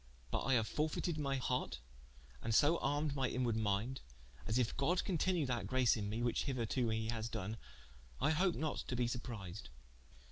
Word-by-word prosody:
But - - 0
I 135 - +4
haue 115 - +4
fortefied 155 +6 -1
my 140 -2 0
harte, 125 0 -1 0.6
and 110 -1 0
so 155 +6 +5
armed 145 +1 0
my 135 -2 +1
inwarde 120 -3 0
minde, 110 +4 0 0.5
as 110 +3 +1
if 125 -3 +1
God 170 +6 +2
continue 180 -3 +1
that 120 -7 -1
grace 130 +1 +4
in 105 -3 -2
me, 115 +3 -2
which 120 - +1
hitherto 125 -2 0
he 110 0 -1
hath 115 -1 -2
done, 105 0 -3 0.6
I 155 - +3
hope 180 +3 +2
not 155 -1 -1
to 125 - -2
be 120 0 +2
surprised. 110 -6 -5
125 Hz, 180 wpm, -37 LUFS, 110-145 Hz, 0.6 s, so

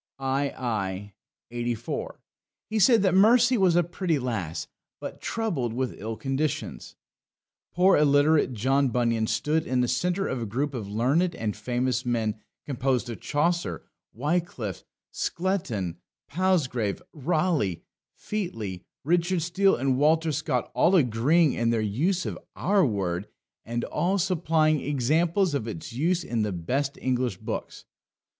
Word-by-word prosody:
ii. 105 -8 -2 0.5
84. 120 -1 -3 0.5
He 220 - +1
said 225 0 +5
that 190 -3 +3
Mercy 240 +6 +5
was 190 -6 +3
a 175 - +4
pretty 175 -1 -1
lass, 110 - -3 0.3
but - - -7
troubled 170 - -2
with 130 +1 -2
ill 110 +1 -4
conditions." 135 +1 -3 0.8
Poor 185 +2 +4
illiterate 145 0 +4
John 135 +5 +2
Bunyan 115 -2 +1
stood 155 +6 0
in 125 -1 +1
the 125 - +1
centre 180 +10 0
of 130 - -3
a 115 - -3
group 140 +7 -2
of 115 -6 -4
learned 140 - +1
and 105 -7 -3
famous 125 +2 -1
men, 115 -3 -1 0.3
composed 130 -3 -1
of 115 - -7
Chaucer, 170 +4 -1 0.3
Wyclif, 140 - -2 0.3
Skelton, 135 - -2 0.3
Palsgrave, 140 - 0
Raleigh, 155 - 0 0.3
Featly, 115 - -4 0.2
Richard 175 +3 +1
Steel, 195 +3 +3
and 130 +1 0
Walter 160 +2 +3
Scott 145 -4 -1
all 185 - +4
agreeing 145 +3 +3
in 115 0 0
their 115 -1 +2
use 150 - 0
of - - -4 0.2
our 195 +1 +2
word, 95 - -1 0.4
and 120 +1 -3
all 190 +3 0
supplying 160 -4 +2
examples 160 +7 +1
of 135 -6 -2
its 105 -1 -6
use 170 +7 +1
in 115 -5 -1
the 105 -1 0
best 130 +11 -2
English 125 -5 -1
books. - - -6
140 Hz, 135 wpm, -26 LUFS, 115-170 Hz, 0.8 s, said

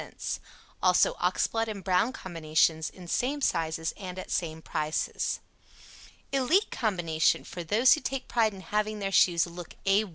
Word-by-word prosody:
Also - - +4
Oxblood 225 0 +1
and 205 -3 -5
Brown 185 +6 +2
Combinations 160 -5 0
in 180 -2 -13
same 265 - 0
sizes 165 - 0
and 185 -3 -7
at 185 - -7
same 160 -2 -2
prices. 155 -1 -2 0.9
"ELITE" 275 - +2
Combination 175 -8 +1
for 175 - -7
those 220 +10 +5
who 305 - -1
take 270 -1 -3
pride 225 -3 +2
in 190 - -10
having 210 +2 -1
their 195 -1 -3
shoes 175 -3 +4
look 175 -1 -9
A 200 +2 +4
1. - - -12
190 Hz, 155 wpm, -28 LUFS, 165-225 Hz, 0.9 s, those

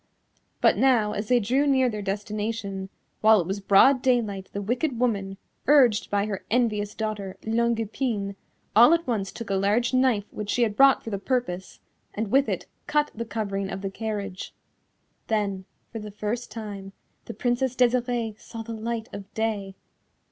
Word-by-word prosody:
But - - +4
now 240 -6 +3
as 205 +1 -3
they 245 +1 +4
drew 255 +7 +1
near 260 -2 +4
their 215 -3 -3
destination, 205 -1 -3 0.3
while 220 0 +6
it 175 - -1
was 195 +3 -3
broad 205 +7 +5
daylight 220 -7 0
the 200 - -4
wicked 245 +5 -1
woman, 200 -6 0 0.3
urged 255 -7 +5
by 205 0 +1
her 205 -3 -4
envious 215 -3 0
daughter, 210 -3 -4
Longue 235 +1 +1
Epine, 210 -3 -2 0.4
all 240 +9 +8
at 335 0 -3
once 210 -7 -2
took 230 -4 -7
a - - +2
large 210 +6 +1
knife 255 -5 +3
which 210 -1 -5
she 245 - +2
had 215 -3 0
brought 275 +1 +5
for 225 - -6
the 200 - -2
purpose, 200 -6 -3 0.3
and 210 -1 -3
with 275 +1 +4
it - - -2 0.2
cut 295 0 +1
the 230 +1 -5
covering 200 -4 -3
of 195 0 -5
the 195 -1 -4
carriage. 205 -3 -5 0.7
Then, 200 -4 -1 0.3
for 225 - -5
the 210 0 -7
first 210 +4 -4
time, 200 -3 -7 0.3
the - - -7
Princess 245 +2 0
Desirée 240 -3 +1
saw 225 -1 -8
the 230 - -6
light 225 0 -4
of 195 -1 -8
day!!! 210 -3 -2
220 Hz, 175 wpm, -26 LUFS, 200-245 Hz, 0.7 s, all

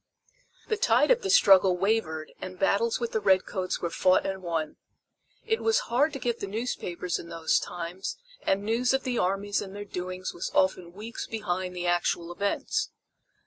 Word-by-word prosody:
The 435 - 0
tide 430 - +4
of - - +4
the 390 - -3
struggle 195 - +6
wavered 180 -6 -1
and 185 0 -6
battles 205 +4 +2
with 235 -1 -2
the 220 - +1
red 190 -2 +3
coats 185 -2 -3
were 170 - -2
fought 185 +1 +3
and 190 -1 -3
won. 165 -3 -3 0.7
It 445 0 0
was 450 +1 +3 0.2
hard 290 +6 +4
to 275 - -4
get 240 -2 -1
the 200 - -4
newspapers 195 -5 -3
in 170 - -9
those 165 -1 +1
times 175 - -5 0.2
and 195 +1 +1
news 240 +4 +2
of 270 - -1
the 250 -2 -1
armies 195 +2 0
and 195 -1 -8
their 205 0 -6
doings 185 -1 -5
was 170 - -4
often 185 -2 +2
weeks 215 +4 -6
behind 185 -4 -3
the 180 0 -3
actual 175 -1 0
events. 200 +3 -1
195 Hz, 185 wpm, -28 LUFS, 180-225 Hz, 0.7 s, struggle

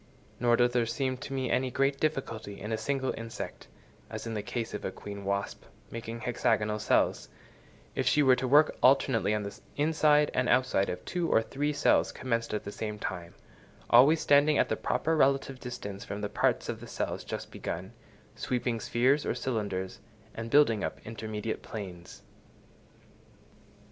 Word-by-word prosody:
Nor 120 0 +4
does 120 0 +4
there 120 -2 +2
seem 130 +2 -1
to 135 - -8
me 130 -2 -1
any 130 0 +1
great 135 +2 +1
difficulty 115 -9 -2
in 105 - -5
a - - +2
single 135 +1 -1
insect 115 0 -7 0.4
(as - - -6
in 115 - -4
the 105 - -2
case 115 +2 -4
of 105 - -5
a - - -1
queen 100 +1 -8
wasp) 100 0 -2 0.3
making 115 0 -6
hexagonal 110 -3 0
cells, 105 - +1 0.6
if - - -1
she 150 - +4
were 130 -2 +6
to 130 - -1
work 150 +4 +5
alternately 130 -4 +4
on 105 - -2
the 100 - -7 0.2
inside 150 -1 +3
and 125 0 +1
outside 125 -6 +2
of 90 0 -5
two 175 -2 -1
or 115 - +4
three 145 +5 -2
cells 145 - +3
commenced 115 -2 -2
at 105 - -2
the 100 - -6
same 105 0 -4
time, 90 -4 -5 0.6
always 140 +7 +7
standing 145 +1 +4
at - - +2
the - - +1
proper 160 +1 0
relative 135 -2 +2
distance 100 -6 -6
from 100 +1 -6
the 105 - -2
parts - - +1
of - - -4
the - - -10
cells - - -3
just - - -6
begun, 95 +6 -5 0.4
sweeping 120 -2 -1
spheres 130 +7 +2
or - - -1
cylinders, 100 -7 -3 0.3
and 115 0 -6
building 115 -7 +4
up - - -3
intermediate 110 -1 -4
planes. 90 -5 -8
120 Hz, 175 wpm, -29 LUFS, 105-135 Hz, 0.6 s, always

